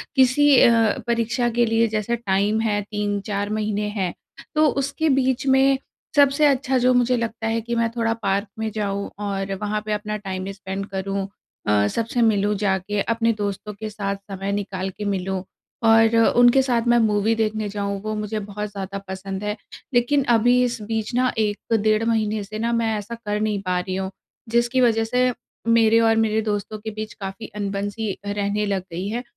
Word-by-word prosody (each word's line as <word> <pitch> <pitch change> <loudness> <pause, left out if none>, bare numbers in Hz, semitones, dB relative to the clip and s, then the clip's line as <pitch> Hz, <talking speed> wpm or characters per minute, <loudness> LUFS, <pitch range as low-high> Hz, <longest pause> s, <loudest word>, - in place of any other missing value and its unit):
किसी 270 +2 +5
अ, 225 -2 +4
परीक्षा 235 +1 +1
के 235 +1 +2
लिए 225 0 +2
जैसे 215 +2 -1
टाइम 205 0 +1
है, 205 -2 0
3-4 205 0 -2
महीने 210 0 -1
हैं, 185 -3 -1 0.4
तो 310 0 +5
उसके 280 +3 0
बीच 265 0 +1
में 265 0 +4 0.4
सबसे 285 +1 +5
अच्छा 265 -1 +1
जो 250 +1 +3
मुझे 245 0 +3
लगता 225 -1 -3
है 225 +1 0
कि 235 +1 -3
मैं 230 0 +1
थोड़ा 225 -1 +1
पार्क 200 +2 0
में 220 0 -1
जाऊँ 200 -2 -2
और 195 -1 -2
वहाँ 210 0 -1
पे 215 - -3
अपना 210 0 -3
टाइम 190 -1 -5
स्पेंड 195 0 -5
करूँ 195 0 -3 0.4
अ, 105 0 +3
सबसे 230 - -1
मिलूँ, 210 -2 +3
जाके 200 0 0
अपने 230 +1 +1
दोस्तों 205 0 -4
के 215 +2 -6
साथ 200 -2 -3 0.2
समय 195 +1 -3
निकाल 195 -2 -3
के 210 - -4
मिलूँ 190 -1 -2 0.4
और 225 0 +5 0.2
उनके 245 +2 +6
साथ 245 -3 +1
मैं 240 0 +5
मूवी 215 0 +2
देखने 215 -1 -1
जाऊँ, 200 -1 -3
वो 215 +1 -3
मुझे 215 0 -3
बहुत 210 +1 -5
ज़्यादा 195 0 -5
पसंद 190 +1 -5
है। 210 0 -1 0.4
लेकिन 255 +4 +3
अभी 245 +2 +4
इस 240 -3 -2
बीच 220 +2 -3
ना 255 0 +2
1 215 +1 -1
डेढ़ 215 +1 +2
महीने 215 -2 0
से 215 +2 -7
ना 235 +1 0
मैं 230 -1 +1
ऐसा 210 +3 -6
कर 210 -2 -3
नहीं 210 -2 0
पा 180 -1 0
रही 185 +1 -4
हूँ, 190 0 -2 0.4
जिसकी 240 +2 +2
वज़ह 225 -2 +3
से 250 +2 +2 0.4
मेरे 230 -1 +5
और 225 0 +4
मेरे 220 0 +2
दोस्तों 210 0 -3
के 220 +1 -6
बीच 215 +1 -6
काफ़ी 195 +2 -7
अनबन-सी 205 +1 -3
रहने 205 +1 -1
लग 195 -2 -1
गई 180 +4 -4
है। 240 +3 -3
215 Hz, 185 wpm, -23 LUFS, 200-230 Hz, 0.4 s, उनके